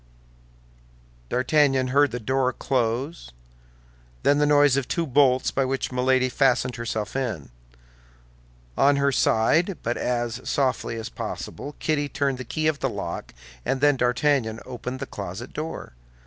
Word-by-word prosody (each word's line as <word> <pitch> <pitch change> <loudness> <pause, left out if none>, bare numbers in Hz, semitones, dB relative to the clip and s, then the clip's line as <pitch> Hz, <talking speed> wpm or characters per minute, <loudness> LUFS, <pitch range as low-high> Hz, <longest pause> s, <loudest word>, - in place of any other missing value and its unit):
D'Artagnan 135 0 +2
heard 145 +2 +4
the 125 - -4
door 130 +2 +1
close; 130 +6 -2 0.9
then 145 +1 +4
the 150 - +3
noise 145 -2 +5
of 140 -2 -1
two 170 -2 -1
bolts 130 -2 +3
by 135 - +1
which 135 0 -2
Milady 130 0 +2
fastened 125 -2 +1
herself 110 -2 -3
in. 105 - -3 1.2
On 140 +1 +4
her 140 0 +2
side, 160 - +2
but 120 +1 -1
as 120 0 -2
softly 130 -4 0
as 115 -1 -5
possible, 145 0 -6
Kitty 145 -2 -1
turned 140 -3 -1
the - - -4
key 155 +4 -3
of 155 -2 +1
the - - 0
lock, - - -5 0.3
and 135 - -1
then 145 0 +4
D'Artagnan 125 -2 +1
opened 130 +1 -6
the - - -2
closet 100 +2 -7
door. 155 - -6
130 Hz, 145 wpm, -25 LUFS, 120-145 Hz, 1.2 s, noise